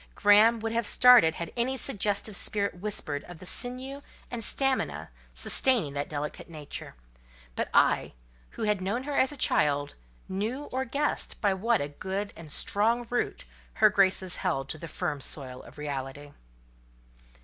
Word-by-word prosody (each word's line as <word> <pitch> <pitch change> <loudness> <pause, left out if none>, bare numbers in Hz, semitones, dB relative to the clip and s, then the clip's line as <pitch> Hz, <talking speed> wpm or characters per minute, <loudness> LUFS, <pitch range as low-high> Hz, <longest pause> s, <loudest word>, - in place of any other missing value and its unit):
Graham 215 +3 +5
would 225 0 -2
have 230 -1 +1
started 245 -11 +7
had 170 -1 -6
any 250 +2 0
suggestive 205 -4 -1
spirit 200 -3 0
whispered 175 -8 -3
of 175 - -10
the 185 - -12
sinew 255 +6 -3 0.3
and 240 -2 -4
the - - 0
stamina 270 +3 0 0.2
sustaining 235 - +4
that 140 0 -3
delicate 150 +2 -5
nature; 150 -3 -8 0.6
but - - -2
I - - +3 0.4
who - - -3
had 210 -3 +1
known 205 +7 -2
her 290 0 -4
as 265 - +3
a 290 - -7
child, 145 - +1 0.3
knew 220 +9 -3
or 260 +1 -1
guessed 285 +4 -2
by 200 -2 +2
what 225 +3 +1
a 145 - -3
good 190 +7 -4
and 160 -2 -11
strong 230 +8 0
root 245 - -2 0.3
her 215 -1 +5
graces 190 -2 +2
held 135 -8 -2
to 155 - -5
the 165 - -7
firm 145 -2 -3
soil 130 -2 -5
of - - -15
reality. 145 0 -5
200 Hz, 160 wpm, -28 LUFS, 155-240 Hz, 0.6 s, started